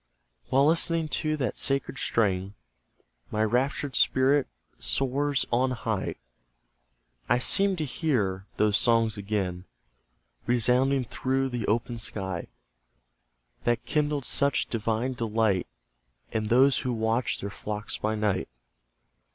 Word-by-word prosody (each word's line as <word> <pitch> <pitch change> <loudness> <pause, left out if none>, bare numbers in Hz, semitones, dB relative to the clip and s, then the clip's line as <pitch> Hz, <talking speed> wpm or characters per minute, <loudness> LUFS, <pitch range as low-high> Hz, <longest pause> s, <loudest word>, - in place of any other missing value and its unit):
While 135 +2 +4
listening 165 0 +2
to 155 +1 -1
that 130 -4 -2
sacred 135 -1 -1
strain, 100 -3 0 0.7
My 110 0 0
raptured 130 +4 0
spirit 135 +2 +3 0.3
soars 135 +1 0
on 130 +2 +3
high; 110 -5 -2 1.1
I - - +4
seem 195 +10 +4
to 160 -3 -2
hear 105 - -1
those 105 -1 +3
songs 115 -2 +3
again 100 -3 -3 0.8
Resounding 125 +3 +2
through 135 +3 -1
the 120 -4 -3
open 115 +2 -1
sky, 95 -5 -4 1.2
That 120 -1 0
kindled 150 -3 0
such 140 +2 +2
divine 115 +3 -1
delight, 110 - 0 0.6
In 110 -1 -1
those 130 +5 +4
who 125 - -2
watched 110 0 0
their 100 - -4
flocks 105 +1 -5
by 110 +1 -1
night. 105 - -1
120 Hz, 115 wpm, -27 LUFS, 105-135 Hz, 1.2 s, While